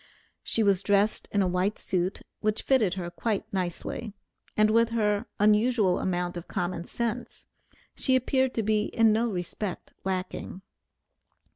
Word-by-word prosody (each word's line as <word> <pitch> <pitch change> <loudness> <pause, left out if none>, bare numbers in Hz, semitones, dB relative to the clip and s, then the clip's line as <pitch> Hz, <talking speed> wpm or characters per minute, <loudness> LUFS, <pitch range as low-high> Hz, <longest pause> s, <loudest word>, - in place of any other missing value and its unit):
She 225 - +2
was 195 -2 +3
dressed 205 +1 +2
in 200 -1 +2
a - - +1
new 180 +3 +1
suit, 185 0 -2 0.2
which 215 0 0
fitted 220 -9 +3
her 175 -2 -4
quite 215 +1 -2
nicely, 190 +3 -3 0.4
and 215 0 +5
with 230 +1 +4
her 210 -1 0
unusual 210 -2 +3
amount 180 -1 -1
of 175 - -8
common 175 -1 -3
sense, 235 +3 -4 0.5
she 260 - +2
appeared 260 0 +1
to 225 - 0
be 210 0 +2
in 225 -2 +3
no 230 +2 +1
respect 185 0 -4
lacking. 190 0 -4
210 Hz, 145 wpm, -27 LUFS, 185-225 Hz, 0.5 s, and